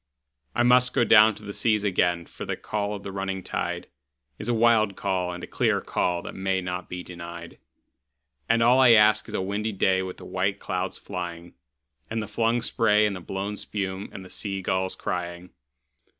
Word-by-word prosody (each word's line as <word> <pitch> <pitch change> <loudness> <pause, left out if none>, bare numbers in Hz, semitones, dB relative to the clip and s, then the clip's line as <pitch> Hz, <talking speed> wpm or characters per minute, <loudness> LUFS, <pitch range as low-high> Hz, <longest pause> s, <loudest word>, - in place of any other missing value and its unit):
I 120 - +3
must 125 +1 +4
down 110 -1 +6
go - - -14
to 105 - -13
the 100 0 -6
seas 105 -1 +1
again, 90 -3 +1
for - - -9
the - - -3
call 105 -1 -3
of 100 - -9
the 100 - -6
running 95 -1 -3
tide - - -3 0.5
Is 105 - -4
a - - +3
wild 110 -3 +3
call 90 -2 -1
and 90 0 -7
a - - -3
clear - - +1
call 85 -1 -1
that - - -7
may 95 0 -1
not 90 0 -5
be 90 0 -5
denied; 85 -1 -9 0.9
And 115 0 +4
all 125 +3 +5
I 125 -3 +8
ask 105 -2 +5
is - - -6
a - - -1
windy 105 +3 -2
day 95 -1 +2
with 95 -1 -6
the - - -11
white 95 +2 -1
clouds 90 +1 -3
flying, 85 -3 -6 0.6
And 115 - -2
the 105 - -4
flung 115 +1 0
spray 105 -3 +3
and 105 -2 -1
the - - -6
blown 95 +3 -4
spume, 95 -1 -4
and 95 - -9
the - - -12
sea 100 -2 -3
gulls 95 +1 0
crying. 90 0 -4
95 Hz, 200 wpm, -26 LUFS, 90-105 Hz, 0.9 s, I